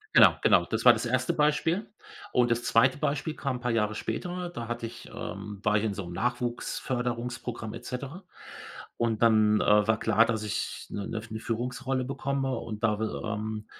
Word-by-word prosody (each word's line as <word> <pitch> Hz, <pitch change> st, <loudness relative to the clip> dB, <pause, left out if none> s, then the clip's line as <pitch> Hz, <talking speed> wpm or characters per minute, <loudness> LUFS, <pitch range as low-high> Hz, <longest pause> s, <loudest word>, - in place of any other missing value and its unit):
Genau, -, -, +9 dB
genau, -, -, +5 dB
das -, -, -2 dB
war -, -, +10 dB
das -, -, -3 dB
1. 155 Hz, +6 st, +1 dB, 0.4 s
Und, 120 Hz, -1 st, +3 dB
das 120 Hz, 0 st, +1 dB
2. 130 Hz, +3 st, +4 dB
Beispiel 150 Hz, +1 st, -1 dB
kam 135 Hz, -3 st, -2 dB
'n -, -, -11 dB
paar 120 Hz, -1 st, -1 dB
Jahre 110 Hz, -2 st, +1 dB
später, 180 Hz, +9 st, -4 dB
da 115 Hz, -9 st, -6 dB
hatte 120 Hz, -1 st, -3 dB
ich, 115 Hz, -, -11 dB
ähm 105 Hz, -1 st, -6 dB
war 105 Hz, 0 st, +3 dB
ich 105 Hz, -, 0 dB
in 110 Hz, -2 st, 0 dB
so 100 Hz, -1 st, -5 dB
’m 85 Hz, -, -7 dB
Nachwuchs-Förderungsprogramm 120 Hz, 0 st, -3 dB
et -, -, -9 dB
cetera 140 Hz, +9 st, -6 dB, 0.8 s
und 115 Hz, -2 st, 0 dB
dann, 110 Hz, -2 st, +5 dB
äh, 105 Hz, +1 st, +4 dB
war 110 Hz, -, +3 dB
klar, 115 Hz, +1 st, +4 dB
dass 110 Hz, -2 st, -1 dB
ich 105 Hz, -, -3 dB
’ne 100 Hz, -, -4 dB
’ne 110 Hz, -1 st, -5 dB
Führungsrolle 125 Hz, +3 st, -2 dB
bekomme 135 Hz, 0 st, -2 dB
und 110 Hz, -2 st, -6 dB
da 105 Hz, -2 st, +2 dB
will 110 Hz, 0 st, -1 dB
ähm, 110 Hz, 0 st, -3 dB
115 Hz, 185 wpm, -28 LUFS, 110-130 Hz, 0.8 s, war